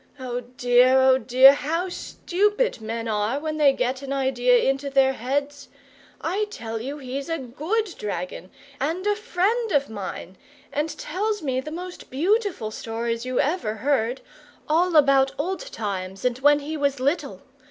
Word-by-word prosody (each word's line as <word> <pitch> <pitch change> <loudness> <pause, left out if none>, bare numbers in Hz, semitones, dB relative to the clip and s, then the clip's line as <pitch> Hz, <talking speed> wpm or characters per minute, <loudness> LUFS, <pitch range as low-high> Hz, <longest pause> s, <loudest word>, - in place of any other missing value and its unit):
"Oh 250 -1 -3
dear, 250 +1 +3
oh 260 0 +5
dear, 260 +3 +7
how 330 +6 -2
STUPID 415 - -1
men 225 +1 -4
are 215 +5 0
when 310 0 -3
they 290 -2 +5
get 255 0 -2
an 275 -1 -6
idea 255 -2 +3
into 270 +1 0
their 270 -1 +3
heads! 280 +4 -3 0.5
I 400 +5 -1
tell 225 - -5
you 275 +5 -5
he's 275 +2 -5
a 330 - 0
GOOD 325 - -2
dragon, 180 -2 -5 0.3
and 330 +8 -2
a 415 0 +2
friend 430 +2 0
of 280 -4 +1
mine, 190 -3 -7 0.4
and 300 +2 0
tells 415 +4 -2
me 260 -2 -1
the 305 - -7
most 355 +3 -8
beautiful 360 - 0
stories 230 +1 -3
you 255 -1 -1
ever 285 -7 0
heard, 250 +1 0 0.5
all 335 +3 +2
about 275 -2 +5
old 380 +11 -3
times 190 -2 -4
and 250 0 0
when 290 +2 +4
he 305 +2 -5
was 280 -2 0
little. 280 +6 -1
275 Hz, 160 wpm, -24 LUFS, 245-325 Hz, 0.5 s, dear